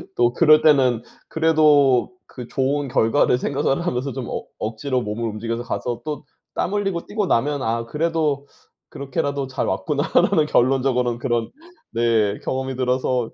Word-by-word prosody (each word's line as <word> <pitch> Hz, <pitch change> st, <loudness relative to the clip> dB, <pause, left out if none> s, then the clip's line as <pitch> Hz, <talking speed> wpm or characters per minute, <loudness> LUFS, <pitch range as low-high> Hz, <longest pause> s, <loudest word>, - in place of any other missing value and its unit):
또 120 Hz, 0 st, +2 dB
그럴 155 Hz, 0 st, +5 dB
때는 130 Hz, -7 st, +4 dB, 0.3 s
그래도 150 Hz, -4 st, +3 dB, 0.2 s
그 125 Hz, -2 st, -9 dB
좋은 140 Hz, +2 st, -1 dB
결과를 120 Hz, +2 st, +2 dB
생각을 145 Hz, +4 st, -1 dB
하면서 130 Hz, -4 st, -2 dB
좀 125 Hz, -1 st, -5 dB
억 -, -, -5 dB
억지로 125 Hz, +4 st, -2 dB
몸을 115 Hz, +2 st, -3 dB
움직여서 115 Hz, +2 st, -4 dB
가서 120 Hz, 0 st, -4 dB
또 150 Hz, -1 st, -4 dB, 0.3 s
땀 190 Hz, -, -2 dB
흘리고 195 Hz, -4 st, -1 dB
뛰고 205 Hz, -2 st, -2 dB
나면 145 Hz, +2 st, +1 dB
'아 115 Hz, -1 st, -1 dB
그래도 150 Hz, 0 st, -1 dB, 0.4 s
그렇게라도 140 Hz, 0 st, -3 dB
잘 130 Hz, -, -3 dB
왔구나.'라는 150 Hz, -, +1 dB
결론적으로는 125 Hz, -2 st, +1 dB
그런 120 Hz, -3 st, -1 dB, 0.4 s
네. 110 Hz, -3 st, +1 dB
경험이 130 Hz, 0 st, -3 dB
들어서 125 Hz, -1 st, 0 dB
130 Hz, 325 characters per minute, -22 LUFS, 120-150 Hz, 0.4 s, 그럴